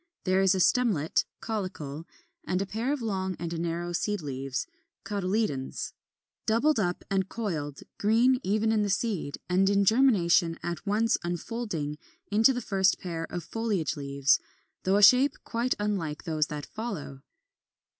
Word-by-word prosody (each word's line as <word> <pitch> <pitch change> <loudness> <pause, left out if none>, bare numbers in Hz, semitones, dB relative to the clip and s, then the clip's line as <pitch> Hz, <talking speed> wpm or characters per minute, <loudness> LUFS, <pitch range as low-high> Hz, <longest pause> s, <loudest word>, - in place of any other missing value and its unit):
There 185 0 +2
is 190 0 +4
a - - 0
stemlet 190 -7 +2 0.2
(caulicle) 180 -9 -4 0.4
and 180 - -1
a 195 - -1
pair 225 +7 -2
of 290 -5 -2
long 190 -4 -2
and 170 -1 -4
narrow 170 +1 -2
seed 205 +4 -1
leaves 135 -1 -3 0.4
(cotyledons), 195 -9 -2 0.5
doubled 235 +6 +3
up 180 -3 -1
and 190 -1 +1
coiled, 155 -11 -4 0.2
green 235 +5 +4
even 215 +2 +1
in 220 -1 +2
the 205 - 0
seed, 200 -7 -1
and 190 +2 +3
in 200 0 +3
germination 190 -8 +4
at 175 +3 -4
once 225 +3 +2
unfolding 175 -4 -3 0.3
into 220 +5 +5
the 250 -1 -2
first 190 -3 +2
pair 165 -2 -4
of 175 0 -5
foliage 205 -4 -1
leaves, 140 -1 +2 0.5
though 190 +2 +3
of 205 - +9
shape 255 +7 +5
quite 240 +2 -1
unlike 190 -8 -2
those 155 -4 0
that 150 -1 -5
follow. 195 - -6
190 Hz, 150 wpm, -28 LUFS, 165-220 Hz, 0.5 s, of